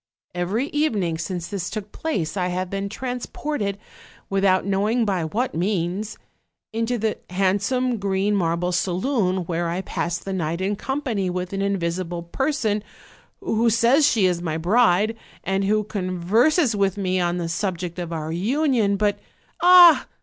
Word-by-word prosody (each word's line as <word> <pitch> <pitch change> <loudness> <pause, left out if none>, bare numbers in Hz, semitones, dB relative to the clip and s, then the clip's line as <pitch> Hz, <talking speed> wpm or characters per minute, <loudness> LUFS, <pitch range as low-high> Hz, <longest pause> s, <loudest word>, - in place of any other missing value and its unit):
Every 185 +8 -1
evening 205 - 0
since 170 +1 -4
this 195 -4 -4
took 210 -1 -6
place 190 - -3
I 180 -2 0
have 180 0 -3
been 195 0 -3
transported, 245 -2 -4 0.5
without 195 -1 +2
knowing 210 +4 +1
by 185 -5 0
what 235 +11 -2
means, 185 +3 -2 0.6
into 230 +2 -1
the 220 -1 -1
handsome 200 +7 0
green 200 +1 0
marble 175 -1 0
saloon, 185 +1 0
where 170 0 -2
I 175 +2 -2
pass 170 -2 -2
the 195 +2 -6
night 170 -2 -2
in 195 +2 -1
company 240 -6 -2
with 180 +1 -4
an 195 - -2
invisible 175 -3 -2
person, 220 - -1 0.6
who 230 +1 +1
says 235 +6 +4
she 225 -9 +3
is 175 -2 +1
my 160 -2 -2
bride, 210 +3 +3 0.3
and 195 +1 0
who 215 +1 +2
converses 215 - +1
with 195 -1 +1
me 185 -2 0
on 175 0 0
the 170 -1 -2
subject 180 0 -3
of 170 -1 -5
our 160 -1 -4
union: 225 - +1
but 205 0 +1 0.2
" - - -26
"Ah! 355 -2 +8
195 Hz, 155 wpm, -23 LUFS, 180-225 Hz, 0.6 s, Ah